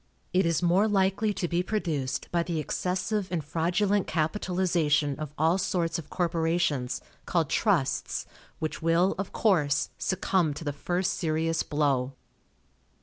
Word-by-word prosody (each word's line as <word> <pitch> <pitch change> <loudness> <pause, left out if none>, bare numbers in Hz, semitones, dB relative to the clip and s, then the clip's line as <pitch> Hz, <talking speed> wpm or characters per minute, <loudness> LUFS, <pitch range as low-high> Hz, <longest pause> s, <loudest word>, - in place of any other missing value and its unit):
It 185 -1 +3
is 165 +1 +1
more 180 +5 +4
likely 195 +1 +2
to 175 - -1
be 170 +1 +1
produced 160 -10 -2
by 170 - +2
the 170 -1 -2
excessive 185 +6 -1
and 170 -4 -1
fraudulent 180 +6 +1
capitalization 160 -4 +1
of 155 -2 -5
all 165 +5 +3
sorts 170 -3 0
of 160 - -10
corporations, 165 -6 0 0.3
called - - +1
trusts, - - +1 0.3
which 155 -1 -4
will, 165 +3 +3
of 195 - -3
course, 150 -9 +2
succumb 180 -5 +1
to - - -7
the 145 -2 -2
first 175 +5 -1
serious 165 0 0
blow. 140 -3 0
170 Hz, 140 wpm, -28 LUFS, 155-185 Hz, 0.3 s, more